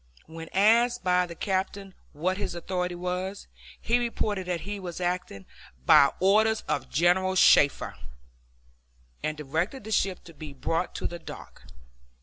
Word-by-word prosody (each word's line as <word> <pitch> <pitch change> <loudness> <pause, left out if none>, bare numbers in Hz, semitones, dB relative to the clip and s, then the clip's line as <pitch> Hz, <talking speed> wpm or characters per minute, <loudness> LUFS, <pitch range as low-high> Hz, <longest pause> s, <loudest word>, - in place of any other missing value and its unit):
When 165 +1 -9
asked 235 +5 +3
by 180 0 +2
the 170 - -9
captain 195 +1 -3 0.2
what 180 +5 -2
his 200 -3 -4
authority 180 0 -3
was, 180 +2 -4 0.3
he 240 +2 +1
reported 210 -5 -2
that 175 -2 -2
he 205 +1 -5
was 180 -2 -7
acting 175 - -3 0.4
"by 140 - +7
orders 215 +4 +3
of - - -3
General 180 +4 +2
Shafter," 145 -5 +4 1.3
and 155 0 -3
directed 160 - -3
the 220 - -8
ship 195 -3 0
to 165 - -13
be 155 -2 -9
brought 165 +6 -2
to - - -5
the 175 - -3
dock. - - -11
180 Hz, 145 wpm, -27 LUFS, 170-200 Hz, 1.3 s, by